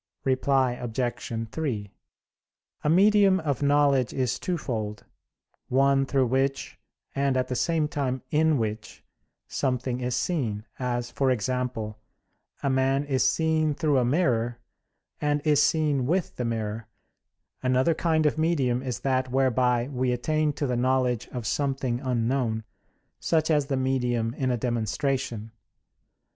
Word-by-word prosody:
Reply 130 -1 +2
Obj. 120 -1 -3
3: 115 -11 -3 0.9
A 150 - +1
medium 195 +2 +5
(of 145 -5 -2
knowledge) 140 -4 +3
is 125 -2 -1
twofold; 115 - -3 0.6
one 135 +1 +3
through 135 -2 +2
which, 135 +2 -1 0.3
and, 140 -1 +1
at 130 - -1
the 125 - -1
same 160 +3 +1
time, 130 -4 -2
in 155 0 +3
which, 110 -3 -4 0.4
something 125 -1 -1
is 125 -1 -1
seen, 120 - -1
as, 120 -1 -2
for 135 -1 +1
example, 125 -2 -2 0.6
a - - +1
man 135 +1 +2
is 135 -2 +1
seen 155 +2 +2
through 150 -4 +2
a - - +2
mirror, 120 -4 +1 0.6
and 145 0 +1
is 150 -2 +4
seen 150 -5 +2
with 180 +3 0
the 125 - -3
mirror: 110 -1 -3 0.7
another 130 +5 +2
kind 160 -1 +1
of 150 +1 +1
medium 135 -7 +1
is 130 -2 -4
that 130 -1 0
whereby 125 -2 +2
we 130 -2 0
attain 155 +5 0
to 145 - -2
the 125 -2 -1
knowledge 125 -1 +1
of 120 -3 -6
something 135 -1 -1
unknown; 120 -2 -1 0.6
such 160 -1 +1
as 145 -3 +2
the 135 -2 -1
medium 125 -3 0
in 130 -1 -1
a 125 - +1
demonstration. 120 0 -2
130 Hz, 135 wpm, -26 LUFS, 120-145 Hz, 0.9 s, medium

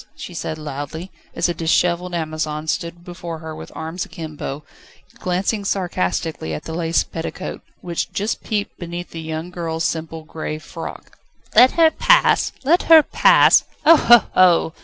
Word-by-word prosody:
she 180 - -9
said 160 -1 -4
loudly, 155 +4 -6 0.2
as - - +1
a 175 - -1
dishevelled 175 +2 0
Amazon 155 -1 -3
stood 170 +2 -4
before 175 -2 -7
her 160 0 -8
with - - -10
arms 160 +3 -4
akimbo, 155 -4 -7 0.6
glancing 190 +4 -1
sarcastically 160 - -2
at - - -7
the 160 - -7
lace 165 0 +1
petticoat, 165 0 -6 0.2
which 170 -2 -3
just 210 +3 -2
peeped 210 -3 -3
beneath 175 0 -6
the 165 - -7
young 160 +2 -5
girl's 165 -2 -3
simple 160 0 -3
grey 155 -1 -5
frock. 155 +2 -9 0.4
"Let 255 +1 +7
her 325 -1 +5
pass? - - +3
Let 330 +7 +3
her 320 -2 +9
pass? - - +5 0.2
Ho! 330 +2 +9
ho! 240 -6 +6
ho!" 175 -3 +4
170 Hz, 155 wpm, -20 LUFS, 160-180 Hz, 0.6 s, her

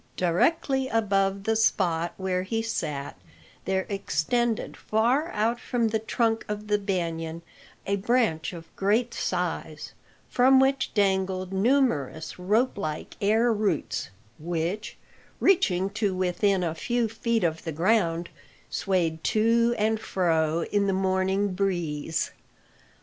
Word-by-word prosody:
Directly 265 - +1
above 195 -4 +1
the 225 +2 +1
spot 175 -6 +1
where 185 -1 -1
he 225 +4 -2
sat 150 - -4 0.5
there 190 0 0
extended 215 +5 -1
far 245 +9 +1
out 230 +3 0
from 235 -2 0
the 220 0 0
trunk 225 0 0
of 210 0 -5
the 210 0 +3
banyan 170 -4 -3 0.4
a 200 +1 0
branch 200 -7 +1
of 165 -2 -11
great 220 +5 +1
size, 170 -4 -3 0.4
from 260 +2 +5
which 265 0 +2
dangled 190 -2 +1
numerous 190 - +1
rope 210 +6 +1
like 155 -5 -4
air 225 +3 +3
roots, 205 -7 -1 0.3
which, 170 +5 -3 0.4
reaching 190 - +3
to 205 -2 -1
within 185 +1 +1
a 165 -2 -1
few 235 +8 0
feet 225 0 -1
of 160 -1 -1
the 165 - -3
ground, 170 0 +1 0.4
swayed 170 -4 0
to 230 +2 +3
and 220 +1 +1
fro 165 -5 +1
in 200 -1 +2
the 195 - +1
morning 190 +1 +1
breeze. 165 -5 -1
195 Hz, 125 wpm, -26 LUFS, 170-225 Hz, 0.5 s, from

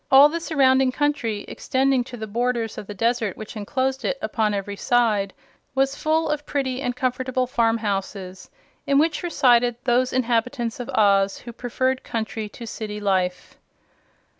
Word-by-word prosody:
All 275 +2 +8
the 335 +2 -3
surrounding 265 -5 +3
country, 250 -7 -1
extending 265 -1 +1
to 245 -1 -9
the 220 - -5
borders 235 +1 -1
of 200 - -9
the 205 - -6
desert 230 -1 0
which 215 +1 -8
enclosed 260 +5 -2
it 270 - -1
upon 215 -1 0
every 200 0 -4
side, 215 -4 +1 0.4
was 270 +1 +2
full 315 +2 +1
of 300 -1 -1
pretty 270 -3 -2
and 245 -3 -2
comfortable 255 0 -1
farmhouses, 205 -6 -2 0.4
in 275 - +3
which 315 +2 +2
resided 245 -8 +3
those 250 0 +2
inhabitants 240 -1 0
of 245 - -5
Oz 200 -2 +3
who 235 - -10
preferred 255 +2 -1
country 220 -1 -4
to 235 - -9
city 210 -1 -5
life. 185 -3 -1
245 Hz, 155 wpm, -23 LUFS, 215-265 Hz, 0.4 s, All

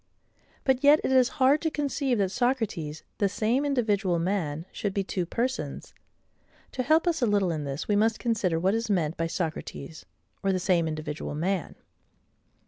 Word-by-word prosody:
But 265 0 +1
yet 290 +2 +7
it - - 0
is 255 -2 +5
hard 275 +2 +4
to 320 - +1
conceive 280 -4 -1
that 195 -2 +1
Socrates, 220 - -1 0.2
the 200 - +2
same 225 +7 +1
individual 215 -10 +1
man, 165 -3 -1
should 200 -2 -3
be 200 - +1
two 185 -2 -3
persons. 250 +7 -3 0.8
To 260 - -2
help 315 +6 +3
us 335 -4 +1
a 240 - +3
little 200 -4 +2
in 155 -3 -3
this, 140 +2 -4
we 210 - +2
must 220 +2 +2
consider 205 -8 0
what 190 +4 +2
is 225 0 -1
meant 170 -5 +1
by 165 - -1
Socrates, 160 -2 -5 0.4
or 195 - +1
the 185 - +1
same 175 -3 +2
individual 155 -1 -4
MAN. 180 +3 -2
200 Hz, 175 wpm, -27 LUFS, 170-255 Hz, 0.8 s, yet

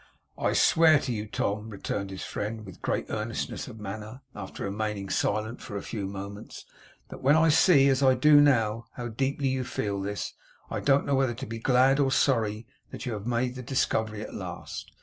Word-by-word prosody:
'I - - 0
swear 160 -2 +5
to 130 - -3
you, 105 -1 -4
Tom,' 105 +1 -2
returned 100 -1 -4
his 95 -1 -6
friend, 110 +1 -4
with 95 -3 -12
great - - -1
earnestness - - -3
of 110 - -10
manner, 105 +5 -7
after - - -7
remaining 100 -1 -3
silent 110 +5 -1
for 100 - -6
a - - -5
few 105 -4 -4
moments, 100 +2 -8 0.4
'that - - -9
when 140 +3 +5
I 160 0 +5
see, 150 -3 +6
as 135 0 +2
I 130 -1 +5
do 145 +3 +6
now, 115 -5 +2
how 120 -1 -4
deeply 135 +4 -1
you 130 0 -1
feel 100 -4 -3
this, 100 +1 -4 0.4
I - - -1
don't 140 0 +3
know 140 - 0
whether 135 -3 +2
to 130 +3 -6
be 115 -2 -6
glad 130 +3 +4
or 135 -2 +3
sorry 115 -5 +1 0.2
that - - -7
you 120 - -2
have 105 +1 -5
made 125 +1 0
the 130 - -7
discovery 110 -4 -1
at - - -8
last. - - -7
115 Hz, 200 wpm, -27 LUFS, 105-135 Hz, 0.4 s, see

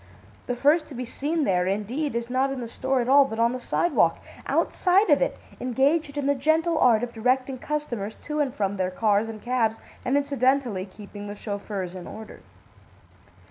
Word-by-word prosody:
The 245 - -1
first 300 +5 +3
to 280 - -9
be 250 +1 -4
seen 300 +6 -2
there, 180 -5 +1
indeed, 230 +9 -2
is 235 0 -2
not 260 +2 +1
in 270 - -4
the 240 - -5
store 260 +2 0
at 240 - -3
all, 280 +2 +7
but 245 -5 -5
on 230 +1 +3
the 255 - -4
sidewalk, 345 +7 +2 0.3
outside 385 +3 +2
of - - +5
it, - - 0 0.2
engaged 280 +4 +1
in 285 - -1
the 285 - +3
gentle 315 +4 +1
art 235 -2 +4
of 240 -1 -4
directing 255 +3 0
customers 240 -9 -3
to 300 0 -3
and 285 -3 +1
from 200 -3 -2
their 185 -1 0
cars 210 +2 +1
and 215 -2 -8
cabs 235 -3 +1 0.3
and 260 +2 +2
incidentally 260 -7 +1
keeping 205 +1 -10
the 205 - -6
chauffeurs 200 -3 -5
in 185 -2 -8
order. 220 0 -10
250 Hz, 190 wpm, -25 LUFS, 215-285 Hz, 0.3 s, all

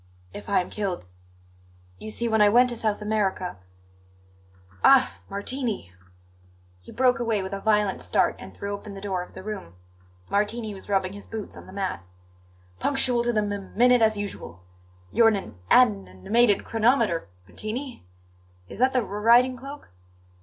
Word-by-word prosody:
"If 105 - -9
I - - +3
am 180 - -8
killed 195 - -3 0.9
You 215 - -7
see, 235 +2 -1
when 220 -1 +2
I 205 - +7
went 245 +4 +5
to - - -4
South 215 -2 -1
America 200 - -1 1.3
Ah, 265 -1 +5
Martini!" 205 - -3 0.9
He - - -13
broke 250 -1 +2
away 225 -4 0
with 190 +1 -6
a 195 - -3
violent 210 -2 +1
start - - +1
and 95 - -10
threw 200 - -5
open 200 0 -8
the - - -7
door 195 -2 -2
of 180 - -11
the - - -9
room. 200 - -7 0.5
Martini 210 +2 -1
was 195 +1 -12
rubbing 190 -1 0
his 205 - -10
boots 220 -2 -6
on - - -12
the - - -11
mat. 190 - -3 0.8
"Punctual 255 -3 +3
to 240 - +2
the 215 -2 +1
m 205 0 -2
m 200 -1 -8
minute, 245 +1 +5
as 220 -1 +3
usual! 85 - -7 0.5
You're 230 - +5
an 220 - +4
an 195 - -6 0.5
n 95 0 -17
nimated 230 -2 +3
chronometer, 225 - +1 0.2
Martini. 245 - -6 0.6
Is - - -10
that 260 +1 +3
the 255 -2 +2
r 200 0 -7
r - - -5
riding 245 +3 +5
cloak?" 275 - -10
210 Hz, 175 wpm, -25 LUFS, 195-235 Hz, 1.3 s, I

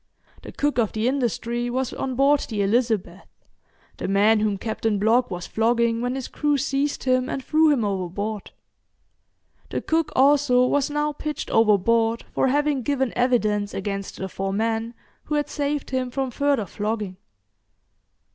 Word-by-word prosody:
The - - -9
cook 290 -3 0
of 220 -3 +1
the 220 +2 0
'Industry' 240 -2 -1
was 260 +1 -2
on 260 -1 -3
board 280 +3 +4
the 210 -3 -1
'Elizabeth', 205 -4 0 0.7
the - - -4
man 205 +3 +4
whom 210 -2 0
Captain 220 0 -1
Blogg 235 +4 +3
was 180 -2 -5
flogging 230 +1 +1
when 245 +1 -1
his 265 -2 -4
crew 295 -1 0
seized 280 +1 -1
him 255 0 +1
and 265 - -4
threw 315 0 +4
him 260 -7 +2
overboard. 200 +2 -3 1.2
The - - -2
cook 325 0 0
also 270 -2 +4
was 285 +2 +1
now 295 0 -1
pitched 300 +1 -5
overboard 225 +2 +3
for - - +1
having 290 0 +1
given 265 0 -1
evidence 215 -5 +1
against 195 0 -4
the 190 - -4
four 195 +1 -4
men 225 +3 -1 0.3
who 300 - -2
had 295 0 -1
saved 290 -1 -2
him 255 -1 -1
from 265 0 -2
further 280 -5 +1
flogging. 210 -1 -4
240 Hz, 155 wpm, -23 LUFS, 215-275 Hz, 1.2 s, board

